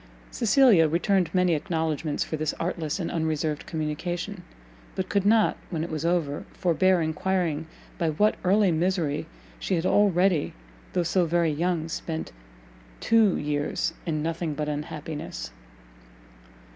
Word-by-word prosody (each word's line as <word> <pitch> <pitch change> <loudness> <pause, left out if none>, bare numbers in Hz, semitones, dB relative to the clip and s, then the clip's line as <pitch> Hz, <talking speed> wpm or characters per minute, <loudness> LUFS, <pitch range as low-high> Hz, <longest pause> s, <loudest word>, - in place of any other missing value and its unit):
Cecilia 230 - +5
returned 175 +2 +1
many 180 -1 +3
acknowledgments 160 -2 -1
for - - -4
this 155 -1 -2
artless 165 -1 -2
and 170 - -3
unreserved 155 -2 -1
communication, 175 +5 -3 0.5
but 190 -1 -3
could 200 -1 +1
not, 220 0 +4
when 160 -3 -2
it 170 - -5
was 155 -1 -3
over, 165 -4 0
forbear 180 0 +2
enquiring 160 -1 -1 0.3
by 165 - +1
what 205 +8 +3
early 195 +1 +4
misery 165 -3 0 0.3
she 190 - -1
had 165 0 -1
already, 185 -5 +3 0.4
though 180 - +1
so 175 +1 +1
very 170 -1 +2
young, 165 +1 -1
spent 160 - -4 0.7
two 220 -4 +4
years 145 +2 -1
in 155 -2 -1
nothing 165 -1 -2
but 150 +1 -2
unhappiness? 150 - -5
165 Hz, 135 wpm, -26 LUFS, 155-185 Hz, 0.7 s, Cecilia